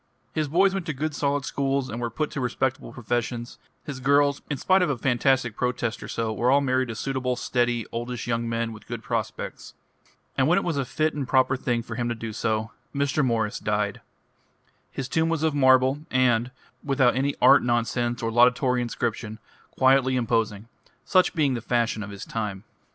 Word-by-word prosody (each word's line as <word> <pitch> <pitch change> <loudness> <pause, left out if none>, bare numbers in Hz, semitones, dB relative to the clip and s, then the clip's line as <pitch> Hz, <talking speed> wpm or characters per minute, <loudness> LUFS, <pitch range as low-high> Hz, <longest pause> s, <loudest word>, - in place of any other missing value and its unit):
His 155 -2 0
boys 190 +6 +3
went 190 -3 -3
to 155 - -2
good 155 +3 -2
solid 145 -1 0
schools, 135 -1 -1
and 120 0 -5
were 120 - -1
put 150 +7 -3
to 140 - -4
respectable 130 +1 -2
professions; 120 0 -3 0.2
his 140 -3 -6
girls, 140 +1 +3
in 145 - -2
spite 190 +7 +3
of 180 - +2
a 140 - -1
fantastic 125 -1 +1
protest 125 -2 -2
or - - -7
so, 115 -1 -2
were 120 +3 +1
all 140 +2 +5
married 130 -2 +1
to 115 - -5
suitable, 130 +1 -2
steady, 120 -2 0
oldish 120 +1 -4
young 115 -1 -1
men 115 0 -2
with 105 - -13
good - - -6
prospects. - - -4 0.6
And 135 -1 +2
when 175 +4 +4
it 195 - +1
was 170 -3 -1
a 135 - 0
fit 155 +5 0
and 140 -3 -4
proper 130 -1 +3
thing 120 -2 -1
for 115 - -7
him 120 +1 -2
to 120 - -2
do 115 -1 -6
so, 110 +1 -1 0.2
Mr. 140 +1 +1
Morris 115 -4 0
died. 105 -1 -1 0.9
His 135 - -4
tomb 160 +4 +1
was 165 -2 -1
of 160 -2 +2
marble, 130 0 +4
and, 125 -2 +2 0.3
without 135 -4 +2
any 140 +2 0
art 135 +2 +7
nonsense 120 0 0
or 115 - 0
laudatory 125 +2 +3
inscription, 115 -2 -3 0.4
quietly 130 0 +4
imposing 115 -3 0 0.4
such 185 -2 +3
being 145 -5 +2
the 120 - -3
fashion 115 -2 0
of 100 - -6
his 100 -1 -8
time. 105 -4 -4
125 Hz, 195 wpm, -25 LUFS, 115-140 Hz, 0.9 s, art